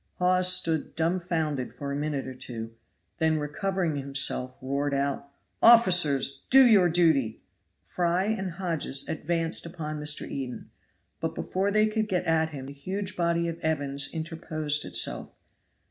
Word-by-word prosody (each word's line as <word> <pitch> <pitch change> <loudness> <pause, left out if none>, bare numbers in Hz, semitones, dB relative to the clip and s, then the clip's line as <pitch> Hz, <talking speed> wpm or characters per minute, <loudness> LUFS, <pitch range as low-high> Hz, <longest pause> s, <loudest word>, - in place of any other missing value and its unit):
Hawes 180 0 +3
stood 165 -5 +1
dumfounded 160 -5 -2
for 140 -1 -6
a - - -3
minute 145 -1 -3
or 130 - -7
two, 115 -3 -8 0.5
then 160 -1 +2
recovering 175 +1 -2
himself 135 -2 0
he - - -13
roared 140 +1 -1
out: 140 0 -2 0.3
"Officers, 180 - +5
do 265 0 +8
your 200 -7 +5
duty!" 160 -10 +1 0.4
Fry 175 +1 -1
and 195 -4 -2
Hodges 165 -6 -2
advanced 165 +1 -1
upon 155 -3 -6
Mr. 150 0 0
Eden, 130 -3 -7 0.5
but 165 0 -4
before 190 +2 -2
they 215 +1 +3
could 215 0 -1
get 185 -3 -1
at 160 -1 +1
him 140 -4 -8
the 140 - -9
huge 190 +8 -5
body 170 -1 0
of 165 0 -5
Evans 140 -3 -1
interposed 155 -2 -2
itself. - - 0
160 Hz, 145 wpm, -27 LUFS, 140-180 Hz, 0.5 s, do